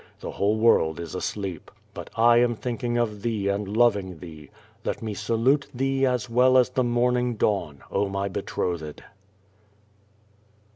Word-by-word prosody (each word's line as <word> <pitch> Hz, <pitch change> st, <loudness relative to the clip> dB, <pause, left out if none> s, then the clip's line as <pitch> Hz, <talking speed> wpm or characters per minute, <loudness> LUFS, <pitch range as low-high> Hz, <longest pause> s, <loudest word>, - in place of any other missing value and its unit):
The -, -, -6 dB
whole 105 Hz, +2 st, 0 dB
world 85 Hz, -8 st, +3 dB
is 85 Hz, -2 st, -7 dB
asleep. 95 Hz, -2 st, -4 dB, 0.2 s
But -, -, -8 dB
1 120 Hz, +1 st, +6 dB
am 120 Hz, -1 st, +2 dB
thinking 120 Hz, +1 st, -3 dB
of 110 Hz, -4 st, -1 dB
thee 105 Hz, -3 st, -1 dB
and 100 Hz, +1 st, -2 dB
loving 100 Hz, -7 st, +2 dB
thee. 80 Hz, -4 st, -11 dB, 0.3 s
Ixit -, -, -3 dB
me 110 Hz, -2 st, -3 dB
salute 125 Hz, +7 st, +1 dB
thee 135 Hz, +1 st, +1 dB
as 125 Hz, -2 st, -1 dB
well 125 Hz, +2 st, +4 dB
as 125 Hz, -1 st, +4 dB
the 130 Hz, 0 st, 0 dB
morn 120 Hz, +1 st, +2 dB
ing 125 Hz, -1 st, -1 dB
dawn, 85 Hz, -10 st, -1 dB
oh 100 Hz, -, 0 dB
my 100 Hz, 0 st, -2 dB
betrothed! 85 Hz, -4 st, -4 dB
110 Hz, 155 wpm, -25 LUFS, 95-120 Hz, 0.3 s, 1